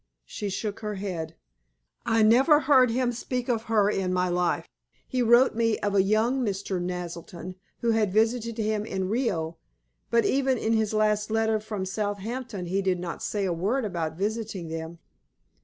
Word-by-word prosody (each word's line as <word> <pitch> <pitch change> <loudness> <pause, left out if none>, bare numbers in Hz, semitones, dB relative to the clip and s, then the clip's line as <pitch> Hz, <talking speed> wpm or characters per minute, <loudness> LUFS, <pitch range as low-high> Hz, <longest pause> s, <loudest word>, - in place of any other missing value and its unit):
She 205 - -5
shook 205 +1 -3
her 210 -1 -4
head. 170 -5 -4 0.7
"I 225 -1 +3
never 265 +8 +5
heard 265 -3 +5
him 245 +1 +1
speak 245 +1 -3
of 230 -3 0
her 215 -3 +3
in 195 -3 0
my 180 0 +1
life. 175 0 0 0.4
He 255 - -1
wrote 240 +2 +5
me 230 -1 +1
of 205 -1 0
a 200 - +5
young 220 +6 +2
Mr. 195 -3 -2
Naselton 175 0 -5 0.3
who 235 - +2
had 220 -3 +2
visited 225 +2 +1
him 215 -1 0
in 190 -3 -3
Rio, 190 -9 -1 0.5
but 235 0 +3
even 265 -1 +2
in 225 0 0
his 220 -1 +1
last 210 0 +2
letter 220 0 +1
from 210 -3 -4
Southampton 205 +2 -4
he 190 +3 0
did 190 -2 +1
not 175 -1 -5
say 205 -2 -1
a 180 - 0
word 210 +10 0
about 165 -5 -3
visiting 205 -3 -3
them. 160 +1 -6
210 Hz, 175 wpm, -26 LUFS, 185-230 Hz, 0.7 s, never